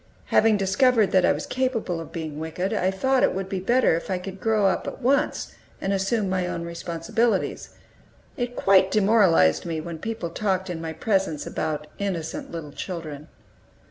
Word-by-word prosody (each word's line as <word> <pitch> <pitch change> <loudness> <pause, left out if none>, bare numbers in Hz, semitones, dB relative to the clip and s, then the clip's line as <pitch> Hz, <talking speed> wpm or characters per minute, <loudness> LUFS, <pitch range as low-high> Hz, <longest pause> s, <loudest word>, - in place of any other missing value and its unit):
Having 220 -1 +5
discovered 205 +3 +3
that 185 -1 +4
I - - +4
was - - -2
capable 245 -9 -1
of 165 - -8
being 155 -3 -5
wicked, 170 +5 -3
I 185 -3 +1
thought 260 +7 +1
it - - +3
would 190 0 -3
be 190 -1 -3
better 240 0 +3
if 170 - -5
I 185 - 0
could 190 +1 -7
grow 220 -2 +2
up 195 - +1
at - - -6
once, 275 +4 0 0.3
and 195 - -1
assume 195 +2 0
my 185 -1 0
own 170 -1 -3
responsibilities. 170 +7 -1 0.7
It 245 -2 -3
quite 190 -1 +4
demoralized 195 - +4
me 165 -2 -3
when 165 0 -6
people 220 -4 -4
talked 190 -1 -1
in 165 -2 -5
my 165 -1 -4
presence 190 -7 0
about 150 -1 -3
"innocent 180 -6 -3
little 165 -3 -6
children." 155 -3 -6
190 Hz, 175 wpm, -25 LUFS, 165-215 Hz, 0.7 s, Having